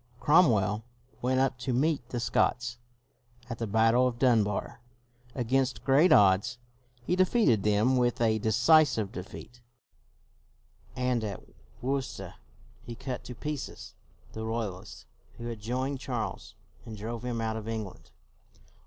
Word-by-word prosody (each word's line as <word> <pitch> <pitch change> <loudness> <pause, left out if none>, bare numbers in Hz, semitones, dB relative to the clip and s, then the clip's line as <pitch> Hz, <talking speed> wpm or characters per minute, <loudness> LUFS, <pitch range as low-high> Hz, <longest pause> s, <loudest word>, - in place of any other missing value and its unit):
Cromwell 110 - +3 0.4
went 130 +1 +1
up 135 -2 +1
to 130 0 -2
meet 135 -1 0
the 120 - -3
Scots. 120 0 0 0.7
At 115 - -5
the 115 - -2
battle 115 +4 +3
of 120 -2 -3
Dunbar, 115 -5 +1 0.5
against 130 +1 0
great 145 +6 +4
odds, 100 -3 +4 0.5
he 180 - +1
de 185 - +5
feated 185 - +2
them 105 +5 +2
with 120 -1 +1
a 110 -2 +2
decisive 120 0 +3
defeat; 115 +6 -9 1.3
and 125 -2 0
at 100 -3 -5 0.4
Worcester 135 0 -3 0.5
he 120 -1 -8
cut 130 +1 -5
to 125 - -8
pieces 150 +3 -6 0.4
the 110 - -5
Royalists 110 -4 -5 0.3
who 120 - -8
had 115 -2 -5
joined 130 +5 -2
Charles, 120 -7 -5 0.3
and 110 -2 -9
drove 115 +3 -5
him 120 -2 -3
out 110 -1 -2
of 110 -1 -6
England. 110 -4 -6
120 Hz, 135 wpm, -29 LUFS, 110-130 Hz, 1.3 s, de